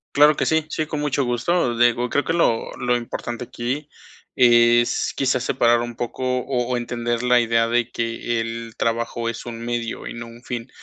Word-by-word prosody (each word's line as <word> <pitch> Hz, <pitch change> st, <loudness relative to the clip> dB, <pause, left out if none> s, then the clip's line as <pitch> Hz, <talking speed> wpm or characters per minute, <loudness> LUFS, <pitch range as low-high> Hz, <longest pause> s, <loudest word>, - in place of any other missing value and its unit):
Claro 150 Hz, +1 st, +6 dB
que -, -, +1 dB
sí 160 Hz, -1 st, +2 dB
sí, 155 Hz, -, -2 dB
con 150 Hz, -1 st, -4 dB
mucho 145 Hz, -2 st, 0 dB
gusto. 120 Hz, +2 st, 0 dB
Digo 120 Hz, +1 st, +2 dB
creo 145 Hz, -, +1 dB
que -, -, -2 dB
lo 140 Hz, -9 st, +1 dB
lo 125 Hz, 0 st, +1 dB
importante 120 Hz, 0 st, -4 dB
aquí 130 Hz, +6 st, -4 dB, 0.5 s
es, 120 Hz, -1 st, +4 dB
quizás, 130 Hz, -2 st, +1 dB
separar 120 Hz, -2 st, +3 dB
un 120 Hz, -1 st, -5 dB
poco, 120 Hz, +1 st, -4 dB, 0.2 s
o 125 Hz, -1 st, -2 dB
o 125 Hz, -1 st, 0 dB
entender 120 Hz, 0 st, -2 dB
la 125 Hz, 0 st, +5 dB
idea 115 Hz, 0 st, +2 dB
de 120 Hz, 0 st, 0 dB
que 115 Hz, 0 st, -2 dB
el 115 Hz, 0 st, -6 dB
trabajo 115 Hz, 0 st, -1 dB
es 115 Hz, +1 st, -4 dB
un 115 Hz, -1 st, -6 dB
medio 120 Hz, -1 st, -4 dB
y -, -, -6 dB
no 115 Hz, 0 st, -7 dB
un 115 Hz, +1 st, -13 dB
fin. 120 Hz, 0 st, -5 dB
120 Hz, 195 wpm, -22 LUFS, 115-125 Hz, 0.5 s, Claro